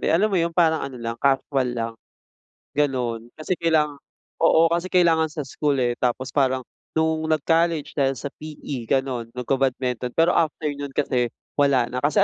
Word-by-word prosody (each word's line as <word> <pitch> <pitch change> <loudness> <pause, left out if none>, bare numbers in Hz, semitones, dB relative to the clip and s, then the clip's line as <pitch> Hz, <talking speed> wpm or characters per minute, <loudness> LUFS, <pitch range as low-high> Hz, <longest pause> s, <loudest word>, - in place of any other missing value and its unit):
eh. - - -1
Alam 200 +6 +3
mo - - +2
yun 165 - +1
parang 160 -2 +4
ano 135 -2 -5
lang, 115 -1 -5
kasual 135 -1 +1
lang, 115 0 -2 0.8
gano'n. 125 -5 -1
Kasi 170 +3 -3
kailanga 150 -3 +1 0.4
oo, 165 0 +5
kasi 170 +2 0
kailangan 170 -3 +3
sa 150 -1 -5
school, 145 +2 -1
eh. 120 - +2
Tapos 125 +1 -1
parang 130 -2 +1 0.3
nung 160 0 +1
nag-college 160 0 +1
dahil 135 -1 +2
sa 140 +3 -6
PE, 145 -6 -7
gano'n 130 -3 0
nagka-badminton, 125 -1 -1
pero 165 +2 +4
after 155 -2 0
no'n 140 -1 -6
kasi 125 -4 +1 0.3
wala 135 -4 +3
na. 125 - -2
Kasi 150 +9 +3
140 Hz, 165 wpm, -23 LUFS, 130-160 Hz, 0.8 s, oo